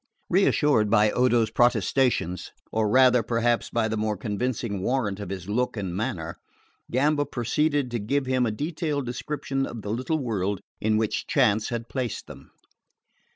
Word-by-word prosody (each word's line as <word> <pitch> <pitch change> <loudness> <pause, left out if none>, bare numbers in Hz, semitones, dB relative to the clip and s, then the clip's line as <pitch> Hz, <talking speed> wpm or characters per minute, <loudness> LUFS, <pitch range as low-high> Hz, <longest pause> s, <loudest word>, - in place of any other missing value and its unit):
Reassured 150 - +3
by 105 -1 +4
Odo's 120 -3 +2
protestations, 120 -5 +1 0.2
or 110 -1 +1
rather, 125 +1 +5
perhaps, 115 +1 0
by 115 -1 0
the 110 0 -2
more 105 -1 -1
convincing 105 -1 -2
warrant 105 -4 -1
of 100 - -6
his 95 -2 -6
look 120 +3 -1
and 95 -4 -3
manner, 85 -5 -3 0.5
Gamba 145 +4 +2
proceeded 145 +1 0
to 120 - -1
give 135 +7 0
him 130 -1 +1
a - - 0
detailed 150 - -2
description 135 +2 -3
of 115 -3 -7
the 105 - -3
little 130 +8 -1
world 100 -8 -1 0.2
in 110 0 +1
which 110 -1 -1
chance 105 +1 +2
had 115 -1 -4
placed 125 -4 -3
them. - - -12
115 Hz, 155 wpm, -26 LUFS, 105-130 Hz, 0.5 s, rather